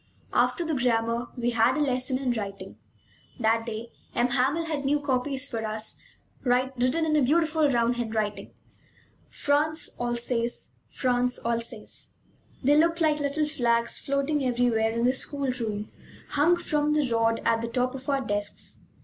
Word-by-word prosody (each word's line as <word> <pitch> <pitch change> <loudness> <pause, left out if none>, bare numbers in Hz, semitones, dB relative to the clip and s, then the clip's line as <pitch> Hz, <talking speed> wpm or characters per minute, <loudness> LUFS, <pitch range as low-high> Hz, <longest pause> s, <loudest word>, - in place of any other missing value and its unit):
After 345 - +2
the 320 - -1
grammar, 235 -2 +1
we 240 0 0
had 235 +4 +3
a - - 0
lesson 255 -2 +1
in 260 -2 -1
writing. 200 -4 -5 0.6
That 225 0 +2
day 230 +1 -5 0.2
M. 245 +1 +2
Hamel 275 +7 +1
had 305 -3 -2
new 290 +2 +2
copies 270 -1 -1
for 225 -4 -4
us, 215 0 -2 0.4
written 255 +4 +1
in 310 -1 +1
a 300 - +4
beautiful 315 +2 +3
round 240 -1 +2
hand: 225 -2 -3 1.1
France, 305 +2 0
Alsace, 240 0 -2 0.2
France, 250 -1 0
Alsace. 230 -1 -4 0.5
They 285 +3 +5
looked 335 +2 +3
like 310 -2 +2
little 290 +1 0
flags 235 -5 +1
floating 280 +1 0
everywhere 240 -3 +2
in 230 +1 0
the 255 - +4
school 275 0 -1
room, 215 -4 -4 0.4
hung 320 +5 +3
from 300 -2 0
the 300 -3 +2
rod 230 0 +2
at 225 0 +3
the 230 - -2
top 250 +2 0
of 265 +1 -7
our 275 -1 +2
desks. 205 -3 -4
250 Hz, 155 wpm, -27 LUFS, 235-290 Hz, 1.1 s, They